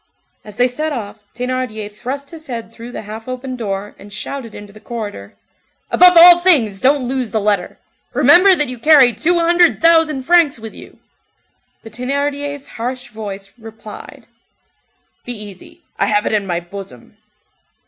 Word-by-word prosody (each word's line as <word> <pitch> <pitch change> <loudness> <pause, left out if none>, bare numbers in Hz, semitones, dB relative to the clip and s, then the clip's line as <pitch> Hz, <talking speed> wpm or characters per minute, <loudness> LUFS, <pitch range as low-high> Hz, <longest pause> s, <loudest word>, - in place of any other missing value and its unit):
As 210 -1 -13
they 245 +2 +3
set 305 +5 -4
off, 215 -6 -6
Thénardier 245 -4 -4
thrust 275 +6 -6
his 320 -1 -11
head 230 -3 -6
through 235 +1 -10
the - - -7
half 220 +2 -9
open 255 0 -5
door, 205 -3 -5
and 205 - -13
shouted 230 +3 -7
into 205 -1 -11
the 215 - -14
corridor:— 210 - -7 0.6
"Above 360 -1 +6
all 350 +1 +9
things, 255 - +3
don't 265 -1 +2
lose 255 -2 -2
the 220 - -1
letter! 200 -3 -1 0.4
remember 370 +2 +6
that 295 -3 0
you 250 -1 -8
carry 275 -3 +6
two 325 - +1
hundred 345 0 +3
thousand 325 -4 +3
francs 335 -2 +3
with 225 -1 -9
you!" - - -14 0.9
The 225 - -11
Thénardier's 280 +3 -3
hoarse 250 +2 -5
voice 200 -2 -8
replied:— 220 -1 -12 1.0
"Be 245 - -5
easy. 205 -4 -12 0.2
I 200 - +2
have 210 0 +1
it - - -1
in 205 -2 0
my 175 -2 -1
bosom." 175 -8 -11
245 Hz, 160 wpm, -17 LUFS, 210-285 Hz, 1.0 s, all